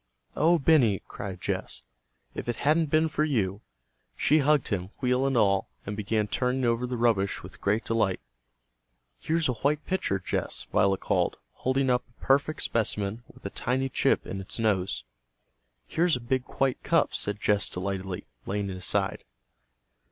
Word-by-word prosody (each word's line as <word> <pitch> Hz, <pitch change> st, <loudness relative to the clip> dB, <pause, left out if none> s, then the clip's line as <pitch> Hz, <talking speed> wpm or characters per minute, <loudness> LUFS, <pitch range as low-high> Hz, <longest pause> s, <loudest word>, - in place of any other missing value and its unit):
"O 170 Hz, +3 st, +4 dB
Benny!" 135 Hz, -, +4 dB
cried 95 Hz, -2 st, -6 dB
Jess, -, -, -3 dB, 0.5 s
"if -, -, -5 dB
it 120 Hz, -, 0 dB
hadn't 155 Hz, +4 st, +2 dB
been 155 Hz, +2 st, +3 dB
for 150 Hz, -1 st, 0 dB
you!" 105 Hz, -9 st, 0 dB, 0.6 s
She 155 Hz, +2 st, +4 dB
hugged 150 Hz, -2 st, +3 dB
him, 90 Hz, -2 st, -2 dB
wheel 125 Hz, 0 st, +2 dB
and 135 Hz, -2 st, +1 dB
all, 100 Hz, -3 st, +3 dB, 0.2 s
and 105 Hz, -, -4 dB
began 105 Hz, +1 st, 0 dB
turning 125 Hz, +4 st, 0 dB
over 120 Hz, +1 st, +1 dB
the 125 Hz, 0 st, -3 dB
rubbish 110 Hz, -5 st, +1 dB
with -, -, -12 dB
great 105 Hz, +3 st, +1 dB
delight. 110 Hz, -5 st, +1 dB, 1.0 s
"Here's 160 Hz, 0 st, +1 dB
a 125 Hz, -, +1 dB
white 145 Hz, +6 st, 0 dB
pitcher, 185 Hz, -, 0 dB
Jess," 95 Hz, -, -2 dB
Violet 95 Hz, -1 st, +3 dB
called, -, -, +1 dB
holding 130 Hz, 0 st, 0 dB
up 125 Hz, 0 st, +2 dB
a 120 Hz, -, -31 dB
perfect 140 Hz, +3 st, +2 dB
specimen 105 Hz, -1 st, -1 dB
with -, -, -20 dB
a 100 Hz, -, -3 dB
tiny 130 Hz, +2 st, -1 dB
chip -, -, +2 dB
in 95 Hz, -, -5 dB
its 95 Hz, -, -4 dB
nose. 105 Hz, -5 st, 0 dB, 0.8 s
"Here's 170 Hz, -1 st, +2 dB
a -, -, -3 dB
big 125 Hz, +1 st, -1 dB
white 135 Hz, -2 st, +2 dB
cup," -, -, +2 dB
said 105 Hz, 0 st, -1 dB
Jess 105 Hz, 0 st, +2 dB
delightedly, 95 Hz, 0 st, -4 dB, 0.2 s
laying 100 Hz, 0 st, -2 dB
it 95 Hz, -, -5 dB
aside. 95 Hz, +1 st, 0 dB
115 Hz, 165 wpm, -28 LUFS, 100-135 Hz, 1.0 s, O